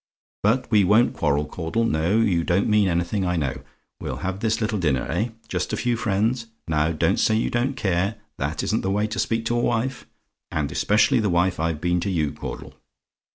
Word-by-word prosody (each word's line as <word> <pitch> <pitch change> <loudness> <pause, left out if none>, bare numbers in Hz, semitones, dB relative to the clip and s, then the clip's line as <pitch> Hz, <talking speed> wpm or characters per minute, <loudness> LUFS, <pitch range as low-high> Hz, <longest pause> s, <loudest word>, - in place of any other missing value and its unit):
"But 115 +5 +2
we 105 -2 +5
won't 105 +6 +4
quarrel, 75 +1 +1
Caudle. 85 +9 -2
No; 85 +2 +1
you 95 -7 +2
don't 85 +4 +1
mean 105 -2 +3
anything, 85 +3 0
I 90 -1 0
know. 70 -6 -2 0.4
We'll - - -4
have 95 +1 -2
this 110 0 0
little 110 -2 -1
dinner, 70 -7 +1
eh? 105 +9 -1 0.2
Just - - -2
a - - 0
few 120 -1 0
friends? 115 +2 0 0.2
Now 80 0 +1
don't 80 - +1
say 110 - +3
you 110 - 0
don't 125 +3 0
care 95 -1 0 0.2
that 70 +2 -2
isn't - - 0
the 95 - -2
way 105 +2 +1
to 110 - -4
speak 115 0 0
to 120 - 0
a - - +1
wife; 120 +2 -1 0.4
and 75 -2 -2
especially 110 - +3
the 105 -2 +1
wife 90 0 +1
I've 80 -1 -1
been 90 0 +1
to 100 - -2
you, 80 -6 0
Caudle. - - -7
100 Hz, 205 wpm, -24 LUFS, 85-110 Hz, 0.4 s, we